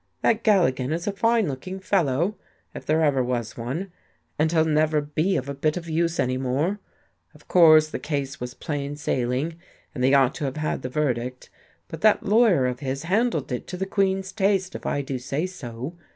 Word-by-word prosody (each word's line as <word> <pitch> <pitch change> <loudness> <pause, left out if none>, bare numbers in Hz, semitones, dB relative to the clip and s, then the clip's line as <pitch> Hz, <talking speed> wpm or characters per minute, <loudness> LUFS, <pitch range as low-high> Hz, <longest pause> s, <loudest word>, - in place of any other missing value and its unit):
That 225 -1 +2
Galligan 150 - +2
is 170 +2 -2
a 205 - 0
fine 225 0 +2
looking 185 +8 -5
fellow, 180 -1 +1 0.4
if - - -9
there 160 +1 +3
ever 135 -4 +2
was 120 -2 -3
one, 145 +12 -4 0.5
and 155 +1 +2
he'll 160 -2 +3
never 155 0 +2
be 155 +6 0
of 130 - -4
a 140 - -3
bit 155 +4 0
of 170 -1 -6
use 165 +1 0
any 130 0 +1
more. 145 +10 -1 0.6
Of - - -19
course 155 -3 +6
the - - -4
case 140 -1 -3
was 125 0 -6
plain 145 -2 -4
sailing, 140 +2 -1 0.4
and 125 - -3
they 135 +2 +5
ought 135 -1 +4
to - - 0
have 135 +1 -3
had 155 -3 -2
the 125 - -4
verdict, 125 -3 -2 0.4
but 160 - -8
that 215 -1 +4
lawyer 205 - +4
of 125 0 -2
his 135 0 -3
handled 195 - 0
it 125 - -4
to 180 - -6
the 190 - -2
queen's 195 -1 0
taste, 195 -2 +1
if - - -6
I 140 - -1
do 135 -1 -4
say 140 +6 -2
so. 135 -4 -7
155 Hz, 200 wpm, -24 LUFS, 130-185 Hz, 0.6 s, course